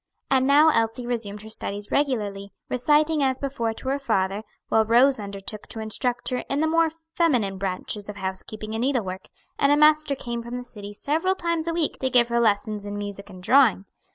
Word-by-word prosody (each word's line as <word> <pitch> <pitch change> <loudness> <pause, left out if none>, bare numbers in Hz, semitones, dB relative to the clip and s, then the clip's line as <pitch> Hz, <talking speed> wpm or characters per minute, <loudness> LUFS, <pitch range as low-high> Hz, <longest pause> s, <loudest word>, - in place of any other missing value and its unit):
And 260 -1 +3
now 295 +3 +6
Elsie 230 -3 0
resumed 215 -4 -3
her 220 - -10
studies 205 -1 -4
regularly, 205 -8 -1 0.2
reciting 300 +4 +2
as 260 -1 +1
before 265 -5 -2
to 260 - -5
her 275 +1 0
father; 200 -6 0 0.3
while 220 - +4
Rose 245 +4 +4
undertook 200 +1 -7
to 225 - -7
instruct 245 +3 -2
her 255 - -1
in 275 - 0
the 315 - +2
more 330 0 +3 0.2
feminine 235 - +1
branches 195 +2 -4
of 210 - -6
housekeeping 205 +3 -5
and 225 - -2
needlework, 220 -8 -1 0.3
and 280 - +4
a 290 - +5
master 305 -1 +4
came 235 -2 -5
from 235 +1 -7
the 250 - -5
city 205 -4 -9
several 320 - 0
times 335 -3 -2
a 335 - 0
week 330 -3 -1
to 260 - 0
give 240 -2 +4
her 235 0 +1
lessons 210 -2 0
in 205 0 -5
music 205 0 -6
and 185 -2 -12
drawing. 260 -5 +4
235 Hz, 200 wpm, -24 LUFS, 205-280 Hz, 0.3 s, now